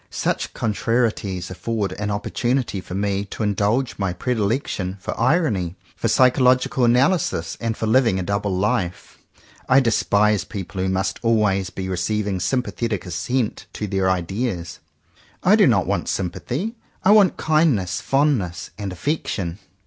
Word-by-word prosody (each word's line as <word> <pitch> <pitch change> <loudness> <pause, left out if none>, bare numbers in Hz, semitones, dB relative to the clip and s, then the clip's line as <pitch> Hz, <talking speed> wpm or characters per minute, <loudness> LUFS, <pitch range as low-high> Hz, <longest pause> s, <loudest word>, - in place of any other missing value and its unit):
Such - - -2
contrarieties 105 -5 -1
afford 105 0 -2
an 105 +2 -4
oppor 100 +1 -3
tunity 120 -6 0
for 90 - -7
me 100 0 0
to 105 - -5
indulge 105 +5 0
my 95 -3 0
predilection 105 -2 -1
for - - -5
irony, 115 - +1 0.2
for - - -1
psychological 130 0 +3
analysis, 125 - +2
and 115 -1 -2
for - - -2
living 115 -3 +3
a 95 - -2
double 100 +2 -1
life. 100 -3 -2 0.5
I 130 - +7
despise 105 -4 +2
people 95 -2 -6
who 95 - 0
must 95 +1 -1
always 105 -5 +2
be 95 -1 -5
receiving 95 +2 -1
sympathetic 115 -2 -1
as 90 - -6
sent 125 +4 -2
to 105 - -4
their 95 -2 0
ideas. 95 0 -2 0.6
I - - +6
do - - +5
not - - +3
want - - -1
sym 90 -3 -1
pathy. 180 - -4 0.3
I 195 - +6
want 205 -4 +5
kindness, 135 - +1
fondness 130 - 0
and 100 -2 -4
affection. 95 - -3
105 Hz, 150 wpm, -22 LUFS, 95-125 Hz, 0.6 s, I